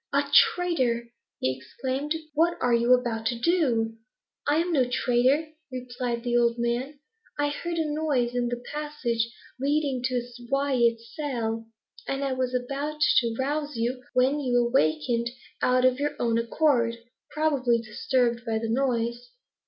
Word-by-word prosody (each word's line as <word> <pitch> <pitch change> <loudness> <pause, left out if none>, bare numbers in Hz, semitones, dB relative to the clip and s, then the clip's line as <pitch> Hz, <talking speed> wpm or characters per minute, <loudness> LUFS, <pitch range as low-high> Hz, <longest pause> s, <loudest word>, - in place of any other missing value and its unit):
"Ah 280 0 +1
traitor!" 255 -12 +3 0.3
he 130 0 0
exclaimed; 260 - -3 0.2
"what 335 +3 +2
are 245 -1 +2
you 235 +1 +3
about 225 -3 -2
to 240 - 0
do?" 235 -7 +1 0.5
"I 290 - +3
am 340 +2 +1
no 255 -5 +2
traitor," 260 +5 +2 0.2
replied 245 -2 -4
the 240 -1 0
old 235 0 +3
man. 240 +5 -1 0.4
"I 290 0 +1
heard 335 +4 -4
a 320 - +1
noise 295 -6 0
in 245 -1 0
the 240 0 -4
passage 255 -7 -2 0.3
leading 280 -1 0
to 250 -2 0 0.3
Wyat's 245 -5 +1
cell, 230 -6 -2 0.4
and 275 -1 -1
was 255 -1 -1
about 280 +4 -3 0.2
to 230 -2 +2
rouse 290 +2 -2
you, 240 +2 -1
when 260 +4 +3
you 250 -4 +1
awakened 235 - +1 0.3
of 255 +1 +3
your 295 +1 -1
own 230 -1 +1
accord, 235 -1 +2 0.3
probably 280 -6 +2
disturbed 235 +2 0
by 225 -2 -1
the 225 0 -3
noise." 240 -1 -1
250 Hz, 145 wpm, -26 LUFS, 235-285 Hz, 0.5 s, traitor